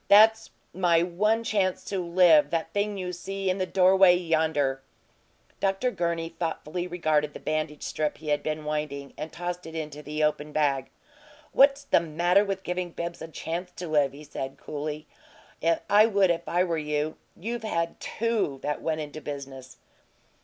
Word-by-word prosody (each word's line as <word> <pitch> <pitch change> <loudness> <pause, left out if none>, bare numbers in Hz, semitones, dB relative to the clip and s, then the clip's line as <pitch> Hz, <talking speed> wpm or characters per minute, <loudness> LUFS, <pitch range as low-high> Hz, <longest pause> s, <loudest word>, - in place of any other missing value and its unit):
"That's 220 +2 +6 0.2
my 170 -2 +3
one 210 +6 +1
chance 200 -4 0
to 195 - -2
live 170 -4 +5
that 165 0 -2
thing 205 0 -1
you 180 -1 -4
see 195 +2 -2
in 185 - -3
the 185 - 0
doorway 185 0 +6
yonder!" 160 -6 +1 0.8
Dr. 195 +6 +1
Gurney 170 -3 -2
thoughtfully 165 +1 -4
regarded 155 -4 0
the - - -6
bandage 155 -1 -2
strip 155 -1 -2
he 155 -1 -7
had 145 0 +2
been 155 0 -3
winding, 150 -2 -3
and 155 - -6
tossed 175 +1 -5
it 160 - -9
into 150 -2 -5
the 150 +1 -3
open 150 0 0
bag. 140 -3 +1 0.6
"What's 275 +1 +5
the 280 - +4
matter 175 +4 +2
with 195 -1 -3
giving 180 0 -2
Bibbs 170 0 -5
a 160 - -5
chance 170 +3 -5
to 175 - -6
live?" 145 -3 +2
he 145 +2 -11
said, 135 -2 -6
coolly. 150 +1 -5 0.8
"I 210 +2 +6
would 200 -4 +3
if 170 0 -3
I 175 +2 +3
were 170 -3 -1
you. 150 0 -2 0.2
You've 230 +5 -3
had 170 -6 -2
TWO 220 -11 -1
that 150 0 -2
went 160 -1 -1
into 150 +1 -7
business." 135 -3 -8
170 Hz, 170 wpm, -27 LUFS, 150-185 Hz, 0.8 s, That's